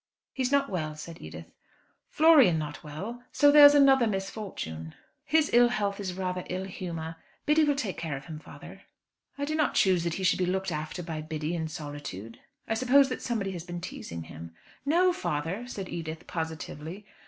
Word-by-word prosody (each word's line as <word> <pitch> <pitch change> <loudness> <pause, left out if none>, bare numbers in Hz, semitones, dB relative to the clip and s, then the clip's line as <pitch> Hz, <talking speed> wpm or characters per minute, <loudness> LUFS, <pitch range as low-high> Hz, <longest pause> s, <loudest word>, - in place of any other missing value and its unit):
"He's 260 -1 -1
not 280 -1 +3
well," 155 - -3
said 165 +2 -9
Edith. 80 +1 -9 0.6
"Florian 300 - +6
not 150 -3 -5
well! 195 +11 -6
So 290 0 +5
there's 290 0 +9
another 270 -4 +6
misfortune." 190 - -5 0.3
"His 315 -1 +2
ill 240 0 +7
health 205 -4 -1
is 185 -3 -4
rather 185 -1 -3
ill 185 +1 -2
humour. 165 -4 -6 0.3
Biddy 305 +1 +4
will 290 -1 +2
take 220 -9 -3
care 160 -4 -3
of 135 - -11
him, 155 -2 -7
father." - - -12 0.6
"I 285 - -1
do 305 - -3
not 310 -1 +1
choose 185 -3 +3
that 170 -1 -1
he 195 - -4
should 185 - +3
be 180 - +2
looked 190 +1 -1
after 155 +4 -4
by 160 -2 -4
Biddy 155 +1 -3
in 160 -2 -2
solitude. 145 - -7 0.3
I - - 0
suppose 260 +4 +4
that 255 - -4
somebody 215 -5 -2
has 175 -3 -6
been 175 0 -6
teasing 85 - -7
him." 80 +1 -10 0.3
"No, 355 +4 +4
father," 175 - -3
said 195 -6 -6
Edith, 160 -2 -6
positively. 160 +3 -6
180 Hz, 185 wpm, -28 LUFS, 155-245 Hz, 0.6 s, there's